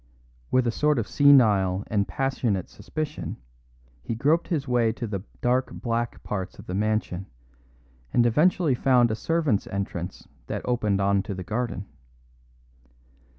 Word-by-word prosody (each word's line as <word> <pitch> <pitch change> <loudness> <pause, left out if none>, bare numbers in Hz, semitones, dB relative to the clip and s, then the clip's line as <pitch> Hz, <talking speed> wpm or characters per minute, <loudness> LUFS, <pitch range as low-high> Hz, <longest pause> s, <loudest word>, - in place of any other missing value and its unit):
With 130 -1 +3
a 120 - +2
sort 150 +3 +2
of 115 - -1
senile 105 -10 +5
and 100 -2 0
passionate 115 -3 -1
suspicion 155 -1 -5 0.6
he 65 - -4
groped 150 +8 +2
his 150 -6 -1
way 120 -2 +2
to 115 - -5
the 100 -4 -3 0.2
dark 125 +1 +1
back 120 0 -3
parts 95 -3 -4
of 100 - -11
the 90 - -5
mansion, 105 -2 -1 0.8
and 120 - +3
eventually 155 +5 +3
found 125 -2 +3
a - - 0
servants' 155 -5 0
entrance 95 -3 -5 0.2
that - - -4
opened 105 -5 +1
on 100 0 +3
to 95 0 -5
the 90 - -5
garden. 110 -1 -3
115 Hz, 145 wpm, -26 LUFS, 100-135 Hz, 0.8 s, senile